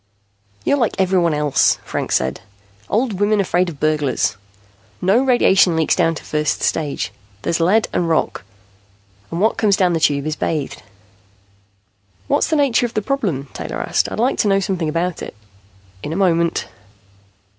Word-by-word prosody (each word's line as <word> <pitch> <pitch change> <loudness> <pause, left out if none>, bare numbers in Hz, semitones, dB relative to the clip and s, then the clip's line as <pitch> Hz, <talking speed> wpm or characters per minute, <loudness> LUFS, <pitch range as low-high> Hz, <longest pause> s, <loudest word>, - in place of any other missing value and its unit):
"You're 285 - +2
like 235 - 0
everyone 180 -4 +2
else," 150 -2 +2
Franks - - -2
said. 65 +1 -1 0.5
"Old 220 -3 0
women 205 +1 +2
afraid 180 -2 +1
of 150 -5 -10
burglars. 150 -4 0 0.6
No 195 +6 +3
radiation 195 -9 +4
leaks 160 -1 +2
down 165 0 +2
to - - -8
first 150 -1 -1
stage. 145 -10 -1 0.3
There's 170 0 0
lead 195 +7 +3
and 170 -2 0
rock, 160 - 0 0.9
and 165 - -4
what 220 +4 +2
comes 205 -3 +3
down 180 -2 +2
the 165 - 0
Tube 145 -2 +1
is 155 0 -2
bathed." 155 -3 -3 1.5
"What's - - +2
the 320 - 0
nature 270 -5 +2
of 235 - -15
the 215 - 0
problem?" 195 - -2
Taylor - - -5
asked. - - 0
"I'd - - -5
like 245 +4 +1
to 215 - +2
know 195 -1 +3
something 185 -5 -2
about 170 +2 -2
it." - - -7 0.7
"In 150 - -5
a - - -3
moment." 170 -3 +1
175 Hz, 165 wpm, -19 LUFS, 155-205 Hz, 1.5 s, radiation